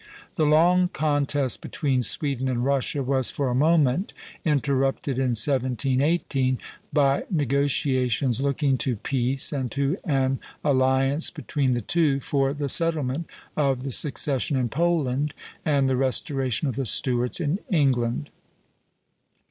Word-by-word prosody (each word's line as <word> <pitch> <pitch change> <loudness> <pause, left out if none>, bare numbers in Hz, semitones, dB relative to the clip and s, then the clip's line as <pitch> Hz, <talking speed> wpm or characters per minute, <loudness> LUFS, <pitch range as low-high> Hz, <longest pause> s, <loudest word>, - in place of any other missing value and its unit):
The 155 - +2
long 175 +4 +4
contest 145 -4 0
between 135 -4 -1
Sweden 130 +2 +1
and 120 -1 -1
Russia 140 0 0
was 130 -1 0
for 140 -2 -2
a - - -1
moment 155 +4 +2 0.3
interrupted 140 -3 0
in 125 -3 +1
1718, 130 +2 +1 0.3
by 140 -2 +2
negotiations 135 - 0
looking 140 -1 0
to 125 +1 0
peace 130 +5 -1
and 130 -4 -3
to 140 +5 0
an 135 -5 0 0.2
alliance 135 +1 +2
between 145 -5 -1
the 120 - -2
two 150 +3 +1
for 135 0 0
the 145 0 -3
settlement 160 -1 +1 0.3
of 135 -4 0
the 135 - -4
succession 140 +1 0
in 125 -2 0
Poland 150 -4 0 0.3
and 140 -3 +2
the 130 - +1
restoration 135 +1 -1
of 130 - -2
the 135 -3 -2
Stuarts 125 - 0
in 165 +3 -1
England. 125 - 0
135 Hz, 130 wpm, -24 LUFS, 130-150 Hz, 0.3 s, long